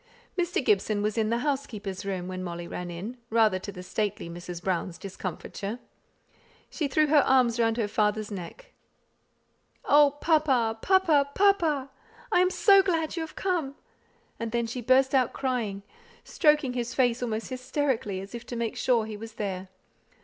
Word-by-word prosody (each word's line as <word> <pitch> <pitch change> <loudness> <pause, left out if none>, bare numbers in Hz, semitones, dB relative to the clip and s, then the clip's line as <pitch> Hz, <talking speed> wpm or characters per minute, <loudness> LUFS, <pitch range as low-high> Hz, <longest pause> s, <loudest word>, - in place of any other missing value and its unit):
Mr. 350 -6 -1
Gibson 205 0 +2
was 210 0 0
in 220 -2 +1
the 235 - +1
housekeeper's 215 -9 -3
room, 185 -2 -3
when 185 0 -5
Molly 170 -1 -5
ran 180 0 -5
in, 195 +9 -6
rather 220 -4 +3
to 200 +2 -7
the 180 -2 -9
stately 195 -3 -3
Mrs. 175 0 -8
Brown's 180 -1 -2
discomfiture. 195 +2 -6 0.9
She 305 - -1
threw 305 +3 +3
her 300 0 +5
arms 250 -3 +3
round 225 0 +2
her 225 -3 0
father's 210 0 0
neck. 200 - -8 1.1
"Oh, 290 -1 +5
papa, 265 -9 +2
papa, 330 -7 +3
papa! 325 -9 +2 0.4
I 360 - +4
am 365 0 +4
so 395 +1 +6
glad 330 -5 -1
you 335 - -2
have 320 - -7
come;" 335 -8 -1 0.6
and 230 -1 -3
then 235 0 0
she 245 +2 -5
burst 260 +3 +3
out 255 -3 +3
crying, 230 -7 -2 0.4
stroking 300 -4 +2
his 245 -1 -3
face 245 -2 +2
almost 225 -2 -3
hysterically 255 -6 -2
as 195 +3 -10
if 235 0 -6
to 240 - -5
make 235 -1 -2
sure 235 -4 +2
he 215 -1 -6
was 225 +1 -9
there. 195 -3 -4
235 Hz, 165 wpm, -27 LUFS, 205-280 Hz, 1.1 s, so